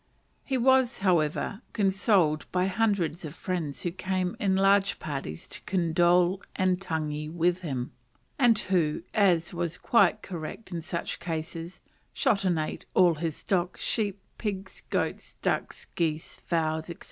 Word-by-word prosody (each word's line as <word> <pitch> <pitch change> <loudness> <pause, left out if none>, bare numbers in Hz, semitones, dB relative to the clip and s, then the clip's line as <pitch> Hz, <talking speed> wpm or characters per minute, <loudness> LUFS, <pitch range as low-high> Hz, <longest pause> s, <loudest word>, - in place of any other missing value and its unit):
He 265 - -1
was, 260 0 +4
however, 175 +4 +1
consoled 190 -6 +2
by 180 0 +2
hundreds 195 -4 0
of 155 -1 -6
friends 175 -6 -3
who 175 - -1
came 185 0 -2
in 195 -2 +2
large 195 +1 +4
parties 135 - -5
to - - -7
condole 175 +1 +3
and 185 -1 +1
tangi 155 -4 -3
with 175 +2 +1
him, 130 -7 -3 0.5
and 240 -4 +5
who, 170 -6 +1
as 180 -5 +3
was 170 0 -2
quite 225 -2 +3
correct 180 +4 -7
in 170 -1 -3
such 170 +1 -3
cases, 165 +1 -5 0.3
shot 200 -1 +2
and 175 -3 +2
ate 155 0 -4
all 180 -2 +6
his 160 -1 -3
stock, 180 -2 -1
sheep, 205 -3 -1 0.2
pigs, 195 -3 -4
goats, - - -2
ducks, - - -1
geese, 160 -1 -1
fowls, 160 -2 -1
&c. 170 - -6
180 Hz, 145 wpm, -28 LUFS, 160-195 Hz, 0.5 s, all